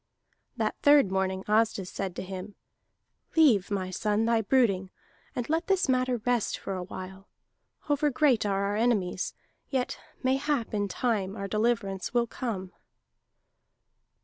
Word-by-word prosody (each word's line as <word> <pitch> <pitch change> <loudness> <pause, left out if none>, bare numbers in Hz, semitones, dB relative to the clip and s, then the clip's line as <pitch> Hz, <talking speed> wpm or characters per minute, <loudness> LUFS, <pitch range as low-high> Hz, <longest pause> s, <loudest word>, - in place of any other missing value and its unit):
That - - 0
third 285 -8 +6
morning 190 0 0
Asdis 210 -3 +1
said 190 -3 -4
to - - -4
him: 190 +2 -7 0.8
"Leave, 260 - +5
my 190 -2 -2
son, 210 +3 0
thy 230 -1 +3
brooding, 205 -5 +2 0.5
and 245 - -2
let 325 +3 0
this 385 -2 +2
matter 255 -1 +2
rest 245 -3 +1
for 195 - -5
a 185 - -3
while. 190 +1 -8 0.6
Over 295 0 +2
great 270 -4 +3
are 200 -1 0
our 200 +1 -1
enemies, 210 -5 0 0.3
yet 260 -3 -1 0.2
mayhap 265 -2 0
in 205 -1 0
time 200 -2 -1
our 200 -2 -4
deliverance 215 -1 -1
will 240 -1 +4
come." 200 -6 -5
215 Hz, 140 wpm, -28 LUFS, 195-250 Hz, 0.8 s, third